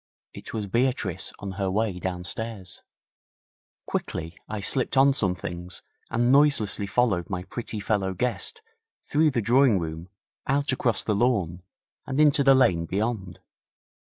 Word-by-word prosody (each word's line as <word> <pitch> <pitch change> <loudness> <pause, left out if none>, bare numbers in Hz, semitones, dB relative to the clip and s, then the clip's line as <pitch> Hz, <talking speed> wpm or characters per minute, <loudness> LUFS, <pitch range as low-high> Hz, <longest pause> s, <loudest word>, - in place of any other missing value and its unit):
It - - -9
was 110 -2 -3
Beatrice 110 -4 0
on 100 -1 -6
her 95 -1 0
way 100 -1 -1
downstairs. 95 +2 -5 1.0
Quickly 80 +1 -4
I 110 0 -3
slipped 130 +6 0
on 135 +1 +6
some 95 -9 0
things 90 0 -6 0.3
and 120 +1 +2
noiselessly 135 -8 +4
followed 100 -5 +1
my 90 -2 -3
pretty 110 +1 -6
fellow 100 -2 -1
guest 125 - -3 0.4
through 155 +1 +3
the 125 -5 -1
drawing 120 -1 +4
room 80 +1 -5 0.4
out 140 +1 +1
across 125 -3 0
the 110 - 0
lawn 100 -7 0 0.5
and 135 - -2
into 145 -2 +5
the 135 -1 +6
lane 85 -10 +3
beyond. 100 -2 -3
105 Hz, 140 wpm, -25 LUFS, 95-130 Hz, 1.0 s, on